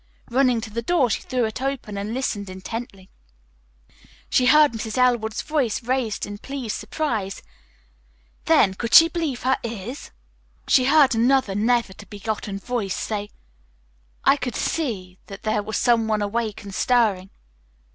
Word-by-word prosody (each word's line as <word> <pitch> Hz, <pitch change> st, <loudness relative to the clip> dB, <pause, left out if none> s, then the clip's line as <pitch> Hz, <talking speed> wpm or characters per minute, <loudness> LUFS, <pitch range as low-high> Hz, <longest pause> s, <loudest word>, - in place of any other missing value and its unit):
Running 250 Hz, -2 st, +3 dB
to 220 Hz, -1 st, -8 dB
the 235 Hz, +2 st, -3 dB
door 265 Hz, -3 st, +2 dB
she -, -, -1 dB
threw 250 Hz, -2 st, -1 dB
it 220 Hz, +3 st, -5 dB
open 265 Hz, -6 st, -3 dB
and 200 Hz, +2 st, -4 dB
listened 215 Hz, -6 st, -3 dB
intently. 190 Hz, +1 st, -7 dB, 1.2 s
She 250 Hz, -, +3 dB
heard 300 Hz, +1 st, +6 dB
Mrs. 220 Hz, 0 st, -5 dB
Elwood's 240 Hz, -4 st, +1 dB
voice 275 Hz, -8 st, -1 dB
raised 245 Hz, -4 st, -1 dB
in 205 Hz, 0 st, -8 dB
pleased 265 Hz, -3 st, -5 dB
surprise, 215 Hz, -5 st, -3 dB, 1.0 s
then, 190 Hz, -, +4 dB
could 230 Hz, +4 st, -1 dB
she 330 Hz, -, +10 dB
believe 320 Hz, -9 st, -3 dB
her 260 Hz, +1 st, +2 dB
ears? 235 Hz, +3 st, -6 dB, 0.6 s
she 255 Hz, -, +4 dB
heard 280 Hz, -1 st, +5 dB
another 240 Hz, -2 st, +2 dB
never 225 Hz, 0 st, +1 dB
to 200 Hz, -, -14 dB
be 205 Hz, -, -9 dB
forgotten 205 Hz, -1 st, -4 dB
voice 205 Hz, -2 st, -3 dB
say, 205 Hz, -1 st, -4 dB, 0.9 s
"I 275 Hz, -, +5 dB
could 250 Hz, -4 st, -4 dB
see 195 Hz, -, -3 dB
that 195 Hz, 0 st, -10 dB
there 215 Hz, -1 st, 0 dB
was 215 Hz, +1 st, -3 dB
some 230 Hz, -2 st, +2 dB
one 215 Hz, -1 st, 0 dB
awake 215 Hz, 0 st, -3 dB
and 200 Hz, -1 st, -9 dB
stirring." 210 Hz, -6 st, +1 dB
230 Hz, 155 wpm, -23 LUFS, 205-255 Hz, 1.2 s, she